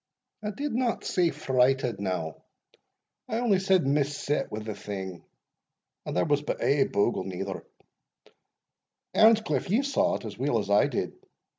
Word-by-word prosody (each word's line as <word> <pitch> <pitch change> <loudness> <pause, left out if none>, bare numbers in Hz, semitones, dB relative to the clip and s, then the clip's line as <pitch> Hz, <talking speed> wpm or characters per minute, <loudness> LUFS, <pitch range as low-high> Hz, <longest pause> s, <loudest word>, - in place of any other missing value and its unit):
"I 210 - -1
did 280 +7 -3
not 245 -1 0
say 180 -3 +2
frighted, 130 -5 +1
now 90 -5 -3 0.9
I 220 - -1
only 230 -5 +2
said 190 -4 +3
mis 140 +1 +1
set 145 - -1
wi' 105 - -4
the 110 0 -4
thing 95 -3 -6 0.8
And - - -2
there 90 - +3
was 145 -1 +2
but 150 - -3
ae 140 -1 +3
bogle, 100 +4 +1
neither 95 +1 -5 1.5
Earnscliff, 220 - +4
ye 225 +8 +3
saw 280 - +1
it; - - -6
as - - -8
weel - - +1
as - - -2
I - - +5
did?" - - -2
140 Hz, 155 wpm, -27 LUFS, -, 1.5 s, I